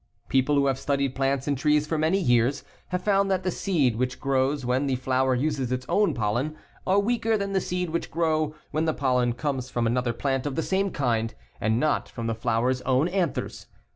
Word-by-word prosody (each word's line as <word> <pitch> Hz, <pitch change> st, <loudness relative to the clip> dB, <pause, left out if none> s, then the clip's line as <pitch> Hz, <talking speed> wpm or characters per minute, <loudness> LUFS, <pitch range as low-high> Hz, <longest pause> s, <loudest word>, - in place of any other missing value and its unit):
People 135 Hz, +2 st, +2 dB
who 140 Hz, 0 st, +3 dB
have 135 Hz, -1 st, +1 dB
studied 140 Hz, -1 st, 0 dB
plants 135 Hz, 0 st, 0 dB
and 145 Hz, -, +1 dB
trees 150 Hz, +2 st, +2 dB
for 160 Hz, -, -2 dB
many 160 Hz, +4 st, +2 dB
years 125 Hz, -3 st, +2 dB, 0.2 s
have 180 Hz, 0 st, -3 dB
found 200 Hz, -1 st, +2 dB
that 190 Hz, -1 st, 0 dB
the 185 Hz, -, 0 dB
seed 145 Hz, -, +1 dB
which 125 Hz, +1 st, -2 dB
grow 135 Hz, +1 st, +1 dB
when 130 Hz, +1 st, 0 dB
the 135 Hz, -, +1 dB
flower 130 Hz, +1 st, +1 dB
uses 135 Hz, -1 st, -1 dB
its 130 Hz, 0 st, -2 dB
own 205 Hz, 0 st, +2 dB
pollen 120 Hz, +8 st, -1 dB, 0.3 s
are 190 Hz, +1 st, +3 dB
weaker 225 Hz, +1 st, +1 dB
than 200 Hz, -1 st, -3 dB
the 190 Hz, -, +2 dB
seed 180 Hz, -2 st, -2 dB
which 170 Hz, -, -2 dB
grow 155 Hz, -2 st, 0 dB, 0.2 s
when 155 Hz, +1 st, 0 dB
the 160 Hz, -, 0 dB
pollen 125 Hz, -3 st, +1 dB
comes 130 Hz, -1 st, -3 dB
from 120 Hz, -1 st, -1 dB
another 120 Hz, +1 st, +1 dB
plant 135 Hz, +3 st, -1 dB
of 140 Hz, -, -3 dB
the 160 Hz, -, 0 dB
same 195 Hz, +1 st, 0 dB
kind 115 Hz, -8 st, -1 dB, 0.2 s
and 110 Hz, +2 st, +1 dB
not 155 Hz, +1 st, 0 dB
from 115 Hz, -, -6 dB
the 115 Hz, -, 0 dB
flower's 120 Hz, +3 st, 0 dB
own 130 Hz, +4 st, +2 dB
anthers. 180 Hz, -5 st, -2 dB
140 Hz, 210 wpm, -26 LUFS, 125-165 Hz, 0.3 s, who